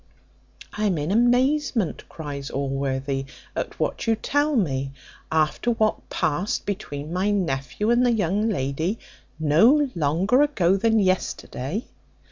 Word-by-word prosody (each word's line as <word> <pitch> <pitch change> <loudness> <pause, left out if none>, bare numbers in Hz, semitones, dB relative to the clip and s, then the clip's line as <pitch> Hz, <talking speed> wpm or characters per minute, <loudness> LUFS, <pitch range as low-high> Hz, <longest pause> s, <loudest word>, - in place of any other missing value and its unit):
"I 215 - -1
am 190 -5 +1
in 150 +4 -2
amazement," 245 - +1
cries 145 -3 -6
Allworthy, 135 0 -2 0.3
"at - - -4
what - - -2
you 225 - +4
tell 290 +6 0
me, 135 - 0 0.4
after 155 +8 +1
what 220 -2 0
passed 180 +8 -1
between 160 -7 -5
my 185 +3 +1
nephew 190 - -1
and 240 +1 +4
the 245 - +4
young 210 0 +1
lady 160 +3 -1 0.4
no 230 - +4
longer 175 - +2
ago 195 -12 +3
than 225 +3 +2
yesterday." 185 - -1
190 Hz, 125 wpm, -24 LUFS, 145-225 Hz, 0.4 s, you